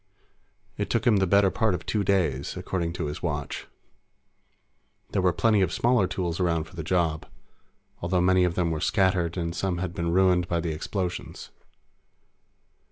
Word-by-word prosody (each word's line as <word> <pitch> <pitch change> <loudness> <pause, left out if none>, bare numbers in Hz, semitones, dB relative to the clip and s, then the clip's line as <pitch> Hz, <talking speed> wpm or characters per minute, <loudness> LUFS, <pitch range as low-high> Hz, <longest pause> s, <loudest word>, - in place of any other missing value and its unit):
It - - -2
took - - 0
him 115 -4 +5
the 95 -1 +2
better 100 +1 +4
part 110 -5 +1
of 85 -1 -7
two 105 +2 0
days, 85 -9 0
according 85 -3 -2
to 90 - -3
his 75 0 -5
watch. 75 -4 -4 1.4
There 95 - +1
were 90 -1 +3
plenty 105 +4 +2
of 90 -3 +1
smaller 120 -4 +2
tools 85 -2 -3
around 85 -3 +1
for 85 +3 -15
the 85 - -4
job, 80 -2 0 0.7
although 90 +1 0
many 90 +1 +4
of 90 -1 0
them 85 -2 0
were 80 -1 -2
scattered 95 -3 +1
and 85 -1 -2
some 90 +1 -1
had 90 -1 -3
been 85 -1 -2
ruined 90 -1 +3
by 85 -1 0
the 85 -1 -2
explosions. 90 +3 -5
90 Hz, 170 wpm, -26 LUFS, 85-95 Hz, 1.4 s, him